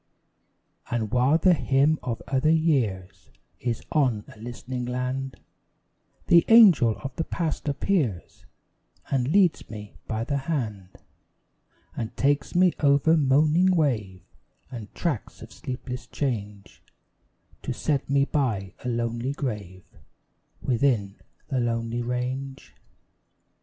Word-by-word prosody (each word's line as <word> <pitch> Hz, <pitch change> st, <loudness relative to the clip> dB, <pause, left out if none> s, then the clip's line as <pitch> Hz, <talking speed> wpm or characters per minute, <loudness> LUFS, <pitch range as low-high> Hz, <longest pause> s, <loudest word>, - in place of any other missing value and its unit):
And 110 Hz, -3 st, -2 dB
while 125 Hz, +5 st, +3 dB
the 180 Hz, +2 st, +4 dB
hymn 145 Hz, 0 st, +2 dB
of 115 Hz, -2 st, -4 dB
other 135 Hz, +3 st, +1 dB
years 130 Hz, -, 0 dB, 0.3 s
Is 120 Hz, -2 st, -3 dB
on 130 Hz, -9 st, +1 dB
a -, -, -18 dB
listening 120 Hz, +2 st, -6 dB
land, 125 Hz, +2 st, -3 dB, 0.9 s
The 170 Hz, -1 st, +6 dB
Angel 180 Hz, -, +7 dB
of 135 Hz, -2 st, -6 dB
the 165 Hz, -, 0 dB
Past 160 Hz, -2 st, -3 dB
appears 140 Hz, -, -2 dB, 0.6 s
And 130 Hz, -3 st, +1 dB
leads 180 Hz, +2 st, +2 dB
me 105 Hz, -2 st, -9 dB
by 110 Hz, 0 st, -2 dB
the 140 Hz, +4 st, -1 dB
hand; 115 Hz, -, -4 dB, 1.0 s
And 115 Hz, -2 st, -5 dB
takes 140 Hz, +2 st, +1 dB
me 180 Hz, 0 st, +5 dB
over 145 Hz, +2 st, +4 dB
moaning 155 Hz, +6 st, +3 dB
wave, 105 Hz, -, -1 dB, 0.5 s
And 115 Hz, -4 st, -8 dB
tracts 150 Hz, -, -3 dB
of -, -, -12 dB
sleepless 125 Hz, -2 st, -6 dB
change, 105 Hz, -7 st, -4 dB, 0.8 s
To -, -, -4 dB
set 140 Hz, -3 st, -1 dB
me 140 Hz, 0 st, +3 dB
by 110 Hz, -, -1 dB
a 125 Hz, -, -2 dB
lonely 120 Hz, +2 st, -2 dB
grave 105 Hz, -, -5 dB, 0.8 s
Within 115 Hz, -6 st, +1 dB, 0.3 s
a 130 Hz, -, +1 dB
lonely 115 Hz, 0 st, -1 dB
range. 125 Hz, +3 st, -4 dB
130 Hz, 115 wpm, -25 LUFS, 115-145 Hz, 1.0 s, Angel